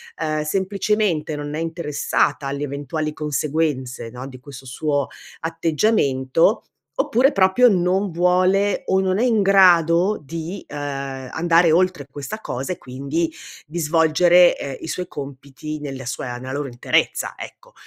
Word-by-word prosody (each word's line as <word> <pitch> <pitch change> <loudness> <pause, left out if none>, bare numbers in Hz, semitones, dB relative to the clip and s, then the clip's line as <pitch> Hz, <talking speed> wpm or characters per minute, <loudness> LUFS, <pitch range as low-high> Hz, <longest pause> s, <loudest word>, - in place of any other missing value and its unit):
ehm, 155 -1 -2
semplicemente 190 -2 0
non 145 0 -5
è - - -3
interessata 150 -3 -1
alle 140 +1 -3
eventuali 145 +2 -3
conseguenze 150 -3 -1 0.2
no, 125 +2 -8
di 130 -2 -11
questo 135 -1 -12
suo 145 +1 -1 0.3
atteggiamento, 165 - +1 0.4
oppure 260 +5 +3
proprio 195 +5 +4
non 185 +1 +1
vuole 185 +4 +2
,o 190 0 +2
non 190 0 +1
è - - +2
in 225 -4 +3
grado 185 0 +5
di, 165 +6 -6
ehm, 135 -3 -5
andare 170 0 +3
oltre 180 -4 +2
questa 145 +10 -6
cosa 135 - -4
e - - -11
quindi 140 +6 -3 0.4
di 170 +3 -5
svolgere, 170 +3 +4
ehm, 140 -1 -5
i - - -7
suoi 180 +1 -4
compiti, 140 +2 -7
nella 135 -3 -6
sua 125 -1 -4
nella 130 +1 -7
loro 145 0 -3
interezza, 120 -1 0
ecco. - - -11
160 Hz, 140 wpm, -21 LUFS, 140-185 Hz, 0.4 s, grado